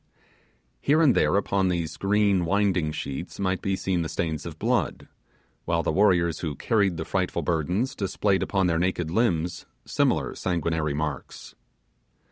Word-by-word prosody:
Here 150 +3 +3
and 150 -6 +5
there - - +2
upon 100 -1 +1
these 85 -3 -2
green 100 -2 +2
winding 95 -3 +1
sheets 70 +3 -6
might 95 -1 0
be 95 -1 0
seen 95 -2 -1
the 80 - -3
stains 80 -1 -3
of - - -8
blood, - - -1 0.6
while 85 0 0
the - - 0
warriors 85 -3 +3
who 80 -4 -3
carried 100 - +1
the 80 - -4
frightful 95 -1 -1
burdens 90 - 0
displayed 100 0 0
upon 95 -2 +1
their 85 -2 +1
naked 90 -2 -1
limbs 85 -6 0 0.2
similar - - +1
sanguinary 80 -4 -1
marks. 75 -2 -5
90 Hz, 150 wpm, -26 LUFS, 80-100 Hz, 0.6 s, and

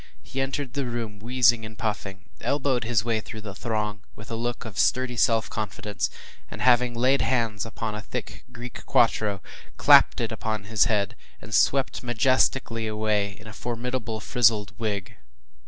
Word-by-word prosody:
He 135 - -4
entered 135 -1 -3
the 140 -2 -2
room 115 -4 -4
wheezing 120 0 +3
and 110 0 -9
puffing, 100 -4 -4 0.2
elbowed 135 -4 0
his 115 -2 +1
way 115 -2 +1
through 110 0 -9
the 105 -2 -7
throng 105 -1 -2
with 110 +2 -11
a - - -1
look 120 +2 -3
of 110 -4 -6
sturdy 130 -1 +2
self 115 -1 +3
confidence, 105 -1 -3 0.4
and, - - -8
having 125 -1 +4
laid 130 +4 +3
hands 115 -4 0
upon 110 -1 -4
a 105 - -5
thick - - -6
Greek 120 0 -8
quarto, 105 -4 +2 0.3
clapped - - +6
it - - -1
upon 110 -2 -3
his 105 0 +2
head, 100 -3 0 0.2
and 110 - -10
swept 135 +4 +2
majestically 120 -1 +1
away 105 -2 0
in 110 - -14
a 110 - -9
formidable 120 -1 -3
frizzled 110 -2 +2
wig. 100 -4 -3
115 Hz, 165 wpm, -26 LUFS, 105-125 Hz, 0.4 s, clapped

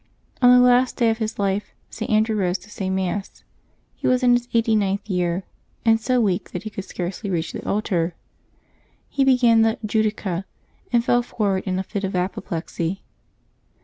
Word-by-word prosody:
On 245 - +7
the 250 0 +7
last 250 +1 +4
day 230 -2 +3
of 225 - -3
his 220 -1 -3
life, 200 0 -1 0.2
St. 220 - -5
Andrew 215 +1 +2
rose 185 -2 0
to 195 +4 -17
say 190 -2 -3
Mass. 190 +1 -3 0.5
He - - -4
was 255 0 +2
in 245 -1 +5
his 245 0 +1
eighty 230 -1 +2
ninth 200 0 0
year, 180 -1 -1 0.4
and 225 0 +4
so 255 +2 +1
weak 195 -6 0
that 180 - -4
he 215 - -6
could 195 -2 -6
scarcely 185 +3 -5
reach 165 -3 -2
the - - -6
altar. 180 -5 0 0.9
He 275 - +1
began 245 -4 +5
the 225 0 +2
Judica," 210 -4 -1 0.5
and 240 -1 +2
fell 245 - +3
forward 200 -5 -1
in 185 0 0
a 190 - -1
fit 200 +1 -5
of 195 -1 -2
apoplexy. 180 0 -3
210 Hz, 180 wpm, -22 LUFS, 190-230 Hz, 0.9 s, On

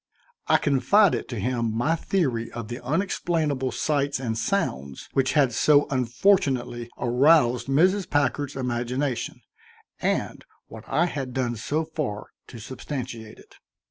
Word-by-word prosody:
I - - +5
confided 175 +8 +3
to 120 -4 -4
him 115 0 -1
my 145 +7 +2
theory 135 -10 -1
of 115 -2 -6
the 120 +1 -6
unexplainable 150 -3 -1
sights 140 -2 0
and 115 -4 -2
sounds 70 - -2
which 135 -1 +1
had 140 -5 +3
so 145 +4 +4
unfortunately 125 - +1
aroused 125 -1 +3
Mrs. 185 +8 +2
Packard's 145 -1 0
imagination, 125 0 -2 0.6
and - - -1 0.2
what 110 0 -12
I 170 - +2
had 135 -7 -4
done 125 -2 -1
so 150 +8 -2
far 145 -10 -4 0.2
to 120 - -10
substantiate 120 -2 -7
it. - - -19
130 Hz, 130 wpm, -25 LUFS, 120-150 Hz, 0.6 s, I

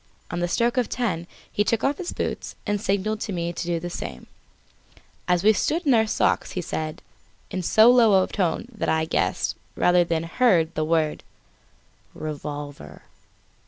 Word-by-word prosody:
On 175 - -2
the 175 - 0
stroke 235 +7 +1
of 250 - +1
ten 180 -9 -2 0.2
he 205 - +1
took 225 +1 0
off 280 +1 +1
his 360 - -3
boots - - -4
and 205 -1 -1
signalled 210 +1 0
to 210 - -4
me 170 -2 -2
to 175 - -4
do 170 -1 0
the 175 - -5
same. - - -6 1.0
As 180 0 +2
we 215 +1 +6
stood 325 - 0
in 275 - +4
our 220 -1 +4
socks - - +1
he - - -2
said, 155 0 -4 0.5
in 185 - -2
so 220 +6 +6
low 220 -6 +5
a - - 0
tone 190 +3 -1
that 215 - -2
I 160 0 +2
guessed, 160 - 0 0.2
rather 180 0 +4
than 165 -1 -1
heard, 170 -3 +2
the 155 - -1
word: 155 -1 0 0.9
"Revolver." 145 -1 -7
180 Hz, 175 wpm, -24 LUFS, 165-220 Hz, 1.0 s, we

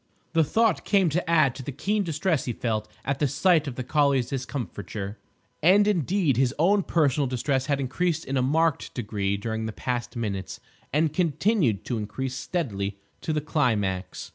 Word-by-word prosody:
The 165 -1 +4
thought 225 +9 +2
came 195 -4 +3
to 165 +2 -1
add 155 -6 +4
to 135 - -8
the 135 - -5
keen 205 +10 0
distress 165 -3 0
he 120 - -2
felt 110 -2 -2 0.2
at 140 0 -1
the 145 - +2
sight 165 +2 +3
of 130 - -4
the 130 - -4
collie's 140 -2 +2
discomfiture. 110 - -5 0.4
And, 195 +6 +5
indeed, 175 - +1
his 130 -1 +2
own 195 +6 +4
personal 145 -6 +1
distress 130 +1 -1
had 140 -1 +1
increased 160 +5 -1
in 135 - -3
a 130 - +2
marked 155 +4 +1
degree 100 -4 -1
during 110 +1 -3
the - - -3
past 120 +2 -3
minutes, 100 -5 -4 0.3
and 155 +1 +2
continued 170 - +1
to 120 -3 -2
increase 125 +5 -4
steadily 105 - -3 0.2
to - - -2
the 155 -1 0
climax. 105 - -1
140 Hz, 175 wpm, -26 LUFS, 115-165 Hz, 0.4 s, And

